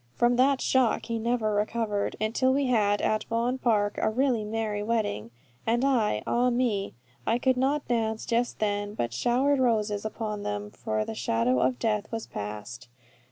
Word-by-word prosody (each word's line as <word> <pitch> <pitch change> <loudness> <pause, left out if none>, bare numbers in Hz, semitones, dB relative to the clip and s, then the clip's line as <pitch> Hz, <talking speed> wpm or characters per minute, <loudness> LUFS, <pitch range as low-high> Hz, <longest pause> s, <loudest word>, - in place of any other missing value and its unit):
From 240 0 +3
that 265 +1 +3
shock 255 -4 +2
he 230 -1 -2
never 225 -2 0
recovered, 210 0 -1
until 225 +5 +1
we 275 +1 +1
had 210 -5 +2
at 215 0 +1
Vaughan 235 +3 -1
Park 210 -4 +1
a - - +2
really 245 -1 +1
merry 210 -1 -2
wedding; 205 - -1 0.3
and 240 +3 +1
I, 225 - +1
ah 245 +1 +2
me, 235 -5 0 0.3
I 230 - +3
could 260 +1 +2
not 275 +3 0
dance 220 -2 -1
just 240 +1 0
then, 205 -1 -1
but 120 - -2
I - - -9
showered 260 - +2
roses 215 -5 +1
upon 215 -1 -4
them, 105 - -4
for 110 0 -2
the - - -5
shadow 115 +2 +1
of 125 0 +1
death 210 - -1
was 225 -1 -4
past. 105 +4 -7
220 Hz, 175 wpm, -27 LUFS, 205-245 Hz, 0.3 s, From